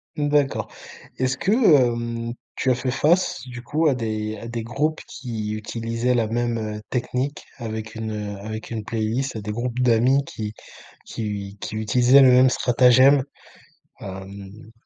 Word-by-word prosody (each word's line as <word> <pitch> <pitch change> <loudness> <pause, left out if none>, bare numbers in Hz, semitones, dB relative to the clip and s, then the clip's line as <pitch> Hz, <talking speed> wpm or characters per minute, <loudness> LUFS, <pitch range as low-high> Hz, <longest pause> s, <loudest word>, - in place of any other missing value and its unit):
Mmh, 145 -1 0
d'accord. 145 -2 +1 0.5
Est-ce 130 0 0
que, 195 - 0
hem, 120 - +3 0.2
tu 130 - +1
as - - +3
fait 125 +1 -2
face, 160 +2 +2
du 120 -1 -8
coup, 155 +6 0
à 140 - +4
des 110 -2 -3
à 115 - -8
des 115 -1 -4
groupes 150 +7 -1
qui 110 -5 -5
utilisaient 115 +3 -2
la 115 -2 +1
même, 120 +1 -1
heu, 105 -1 -4
technique 130 +3 -2
avec 110 -2 -5
une, 110 0 -4
heu 105 -1 -5
avec 110 +3 -7
une 110 -2 -3
playlist, 115 +3 -2
des 105 0 -5
groupes 120 +2 -3
d'amis 125 +3 +3
qui 105 -4 -6 0.5
qui 115 - -6
u 100 -1 -5
qui - - -6
utilisaient 125 +5 +5
le 130 - +7
même 125 +1 +6
stratagème? 130 +3 +5 0.8
Hem 100 +3 -9
120 Hz, 160 wpm, -23 LUFS, 110-130 Hz, 0.8 s, le